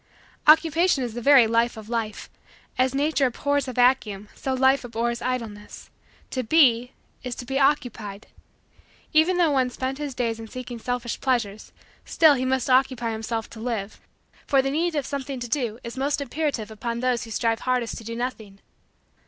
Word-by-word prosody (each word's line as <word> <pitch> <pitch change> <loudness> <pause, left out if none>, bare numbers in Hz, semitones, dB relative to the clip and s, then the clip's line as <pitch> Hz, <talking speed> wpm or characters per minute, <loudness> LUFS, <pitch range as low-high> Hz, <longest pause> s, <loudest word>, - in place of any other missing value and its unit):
Occupation 320 -1 +5
is 240 -3 -4
the 240 - -5
very 275 -1 +7
life 230 +1 +1
of 215 -1 -9
Life. 225 -2 -3 0.5
As 255 +1 +1
nature 285 -1 +2
abhors 285 +3 -1
a 255 - -4
vacuum 240 -5 +2
so 265 - -4
life 265 +1 +3
abhors 235 0 -2
idleness. 230 -5 -5 0.4
To 255 - -1
be 250 -2 +3 0.3
is 250 -2 -4
to 245 - -8
be 270 +2 -1
occupied. 225 -7 0 0.9
Even 320 +4 +4
though 340 -4 +3
one 260 -2 +2
spend 260 +2 -4
his 290 -3 -4
days 230 -3 -1
in 225 - -8
seeking 245 0 -7
selfish 245 0 -3
pleasures 225 -6 -1 0.3
still 315 -3 +5
must 260 -1 0
he 260 - +3
occupy 255 -3 +2
himself 225 0 -3
to 225 - -10
live, 220 -3 -4 0.5
for 270 -2 +3
the 270 - -1
need 330 +3 0
of 290 -3 -1
something 275 -2 -4
to 240 - -5
do 240 -4 -1
is 235 +1 -7
most 280 +2 0
imperative 280 -5 -3
upon 235 +2 -4
those 250 -2 0
who - - -12
strive 225 0 0
hardest 250 -2 -1
to - - -12
do 230 +1 -6
nothing. 230 -5 -5
250 Hz, 175 wpm, -24 LUFS, 230-275 Hz, 0.9 s, very